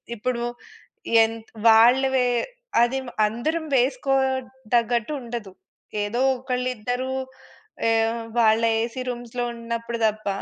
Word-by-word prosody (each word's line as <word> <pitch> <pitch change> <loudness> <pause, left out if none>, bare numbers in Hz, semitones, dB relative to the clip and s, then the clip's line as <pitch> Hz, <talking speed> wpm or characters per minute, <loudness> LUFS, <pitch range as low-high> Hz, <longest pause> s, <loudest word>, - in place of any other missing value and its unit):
ఇప్పుడు 235 +2 -2 0.8
ఎం‌త్ 225 0 -4 0.2
వాళ్ళ 235 +4 +7
వే 250 -1 +3 0.5
అది 240 +3 +2 0.3
అందరం 315 +9 -2
వేసుకోదగ్గట్టు 255 -2 0
ఉండదు. 230 -5 -6 0.5
ఏదో 225 +4 -2 0.2
ఒకళ్ళిద్దరు 250 0 -2 0.8
ఏ - - +4 0.5
వాళ్ళ 220 -1 +4 0.2
ఏసీ 240 +2 -3
రూమ్స్‌లో 245 0 -4
ఉన్నప్పుడు 235 0 -4
తప్ప 215 -1 -4
240 Hz, 90 wpm, -24 LUFS, 230-255 Hz, 0.8 s, వాళ్ళ